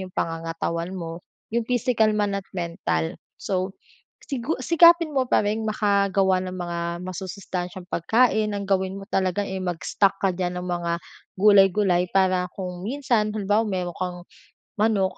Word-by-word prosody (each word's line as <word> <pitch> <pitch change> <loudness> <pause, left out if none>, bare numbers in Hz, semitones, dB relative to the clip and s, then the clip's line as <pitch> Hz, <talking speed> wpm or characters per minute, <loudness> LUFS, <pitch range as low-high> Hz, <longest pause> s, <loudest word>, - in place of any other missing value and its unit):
yung 190 - -6
pangangatawan 165 +2 -3
mo, 165 -1 -6 0.3
yung 235 - +2
physical 225 -3 +2
man 205 -1 0
at 190 - -22
mental. 170 -1 -2 0.2
So, 190 0 -3 0.5
sigu 275 +2 -2
sikapin 335 -1 +6
mo 260 -2 0
pa - - +3
ring 215 +1 -1
makagawa 200 -3 +2
ng 185 0 -5
mga 175 -1 -4 0.3
masusustansyang 185 0 -5
pagkain, 220 +4 +3
ang 200 - -3
gawin 190 -1 0
mo 195 - -8
talaga, 190 +1 +1
eh, 190 -1 -4
mag-stock 185 +3 0
ka 190 - +3
diyan 180 0 -3
ng - - -6
mga 175 -1 -1 0.5
gulay-gulay 195 -2 +5
para 185 -2 +2
kung 180 -2 -5
minsan 240 -5 +1
halimbawa 210 +2 +1
mayro'n 180 -3 -3
kang 180 -1 -3 0.6
manok 205 -3 +1
190 Hz, 145 wpm, -24 LUFS, 180-210 Hz, 0.6 s, sikapin